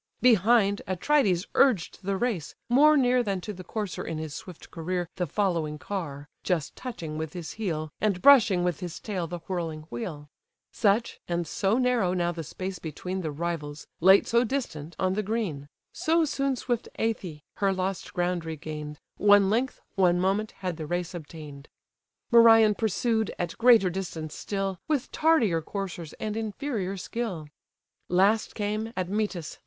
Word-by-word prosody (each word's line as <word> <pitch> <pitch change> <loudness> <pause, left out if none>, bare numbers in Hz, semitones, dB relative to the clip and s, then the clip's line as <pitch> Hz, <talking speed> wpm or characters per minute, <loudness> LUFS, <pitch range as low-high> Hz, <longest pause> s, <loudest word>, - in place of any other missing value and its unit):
Behind, 220 -3 +4
Atrides 190 -1 +2
urged 240 -12 +3
the 195 0 -1
race, 210 -9 -2
more 295 +5 +6
near 250 -2 +4
Than 200 -5 -1
to 210 - -5
the 185 -1 -9
courser 205 +1 -4
in 165 - -4
his 155 -2 -5
swift 180 +1 -10
career 175 +1 -3
The 180 -1 -1
following 165 -4 -1
car, 150 -6 -5 0.2
just 165 -5 -1
touching 165 -12 -6
with 160 -1 -4
his 175 -3 -6
heel 160 -8 -3
And 205 -4 +1
brushing 225 -8 +6
with 175 -4 -1
his 175 -2 -6
tail 185 -6 -3
the 175 0 -6
whirling 165 -4 -3
wheel: 145 +5 -5 0.4
Such, 215 +1 +1
and 175 0 -1
so 195 +7 0
narrow 250 -8 +2
now 175 -1 +1
the 165 -1 -5
space 185 +4 -6
between 180 +4 -5
The 160 - -3
rivals, 150 -1 -4
late 190 +3 +6
so 235 +1 +3
distant 175 - -4
on 185 0 +1
the 210 - 0
green; 195 -10 -3 0.3
So 325 +1 +2
soon 275 -2 0
swift 240 -2 -2
Æthe 185 -9 -2
her 195 -1 +2
lost 190 0 -3
ground 175 -1 -1
regain'd, 150 -2 -6 0.2
One 205 -1 +5
length, 250 +4 0
one 180 -2 +3
moment, 195 +4 +1
had 180 -4 -4
the 155 -2 -5
race 175 +2 -2
obtain'd. 150 -4 -9 0.6
Merion 225 -2 +7
pursued, 220 +1 0
at 175 -1 -3
greater 230 -6 +6
distance 170 -4 -5
still, 195 -2 -3
With 295 -5 -1
tardier 245 - +3
coursers, 175 -3 -5
and 215 -1 -4
inferior 220 -3 -3
skill. 185 -7 -4 0.6
Last 195 +5 +2
came, 215 +1 -2
Admetus! 185 -2 -2
190 Hz, 160 wpm, -27 LUFS, 165-220 Hz, 0.6 s, Merion